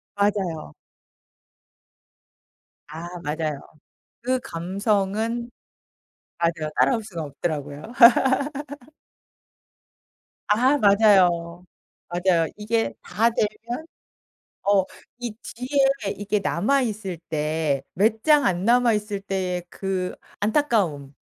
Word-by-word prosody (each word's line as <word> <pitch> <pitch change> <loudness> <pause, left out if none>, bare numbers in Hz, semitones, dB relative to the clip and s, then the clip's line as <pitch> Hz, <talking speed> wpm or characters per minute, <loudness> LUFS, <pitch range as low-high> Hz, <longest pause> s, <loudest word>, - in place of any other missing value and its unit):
맞아요. 195 - -1 2.2
아 160 +3 -8 0.2
맞아요. 150 -2 -2 0.6
그 255 +2 0
감성은 210 +3 -1 0.9
맞아요. 165 -2 -1
따라올 235 -3 +3
수가 180 -6 -6
없더라고요. 145 -1 -4 2.7
아 250 +7 +4
맞아요. 185 -5 +4 0.4
맞아요. 175 -1 +2
이게 225 +2 -1
다 225 +6 +1
되면 235 +7 -3 0.8
어 195 -1 +3 0.3
이 240 -2 -4
뒤에 270 -3 0
이게 205 +1 -1
남아있을 210 -1 0
때, 155 -2 0
몇 220 +4 +2
장 300 -2 +5
안 180 0 0
남아 240 0 +4
있을 210 -1 -2
때의 185 -2 -2
그 190 -2 -3 0.2
안타까움, 200 - 0
200 Hz, 170 characters per minute, -24 LUFS, 170-225 Hz, 2.7 s, 장